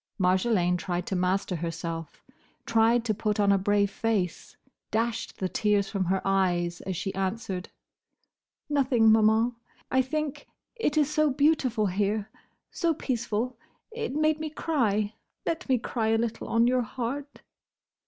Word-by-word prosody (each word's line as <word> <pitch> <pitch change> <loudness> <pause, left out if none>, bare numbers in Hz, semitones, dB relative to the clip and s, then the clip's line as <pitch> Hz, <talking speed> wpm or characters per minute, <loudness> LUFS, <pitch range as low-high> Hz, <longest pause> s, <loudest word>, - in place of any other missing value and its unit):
Marjolaine 185 -1 +2
tried 175 0 -3
to 195 - -2
master 185 0 0
herself; 165 0 -5 0.4
tried 230 +1 +3
to 220 - +1
put 210 0 -1
on 200 -1 +4
a 200 - +5
brave 200 +1 +2
face; 200 -6 -2 0.3
dashed 230 +1 -1
the 185 - -1
tears 205 0 +1
from 195 -3 0
her 190 +2 0
eyes, 180 -3 +1
as 190 - -2
she 195 +1 -3
answered—"Nothing, 225 - -2
Maman. 220 +2 +4 0.4
I 260 - +4
think—it 300 - -4
is 300 -2 +4
so 305 -1 +3
beautiful 265 -6 +2
here!—So 210 - -2
peaceful! 245 -3 -2 0.3
It 450 - -4
made 310 0 +2
me 310 0 -3
cry. 220 -10 0 0.3
Let 330 -2 -2
me 260 - +4
cry 230 -1 -2
a 225 0 +3
little 230 0 -2
on 230 +1 +3
your 250 +1 +3
heart." 260 +5 -5
220 Hz, 135 wpm, -27 LUFS, 195-255 Hz, 0.4 s, a